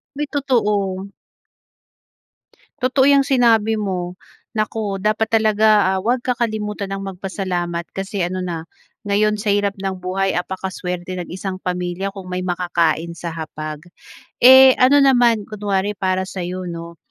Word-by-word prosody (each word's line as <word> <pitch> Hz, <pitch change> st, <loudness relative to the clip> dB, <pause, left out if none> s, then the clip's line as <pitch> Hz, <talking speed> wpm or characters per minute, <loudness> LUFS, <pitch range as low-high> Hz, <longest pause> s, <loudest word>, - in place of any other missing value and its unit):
May 295 Hz, -, -2 dB
totoo. 205 Hz, -8 st, 0 dB, 1.7 s
Totoo 265 Hz, +2 st, +3 dB
'yang 280 Hz, -1 st, +5 dB
sinabi 230 Hz, -5 st, +3 dB
mo. 185 Hz, -4 st, -3 dB, 0.4 s
Naku 215 Hz, -2 st, -2 dB
dapat 215 Hz, +1 st, 0 dB
talaga, 215 Hz, -3 st, +4 dB
ah, -, -, -1 dB
huwag 240 Hz, +4 st, 0 dB
kakalimutan 215 Hz, -5 st, -2 dB
ang 195 Hz, -, -4 dB
magpasalamat 180 Hz, -2 st, -3 dB
kasi 195 Hz, 0 st, -4 dB
ano 185 Hz, +1 st, -3 dB
na 170 Hz, -3 st, -4 dB, 0.4 s
ngayon 210 Hz, +1 st, +2 dB
sa 210 Hz, -, -1 dB
hirap 205 Hz, -1 st, +1 dB
ng 190 Hz, -1 st, -3 dB
buhay 190 Hz, +1 st, -1 dB
apaka-swerte 180 Hz, -1 st, -4 dB
ng 175 Hz, -, -6 dB
isang 190 Hz, 0 st, -4 dB
pamilya 180 Hz, +1 st, -3 dB
kung 195 Hz, -2 st, -9 dB
may 180 Hz, 0 st, -3 dB
makakain 170 Hz, -2 st, 0 dB
sa 170 Hz, -, -5 dB
hapag. 155 Hz, -1 st, -6 dB, 0.6 s
Eh, 260 Hz, +1 st, +9 dB
ano 275 Hz, +3 st, +6 dB
naman 240 Hz, -5 st, +4 dB
kunwari 205 Hz, -1 st, -1 dB
para 185 Hz, 0 st, 0 dB
sa'yo, 185 Hz, -1 st, -5 dB
'no, 170 Hz, 0 st, -7 dB
195 Hz, 135 wpm, -20 LUFS, 180-220 Hz, 1.7 s, Eh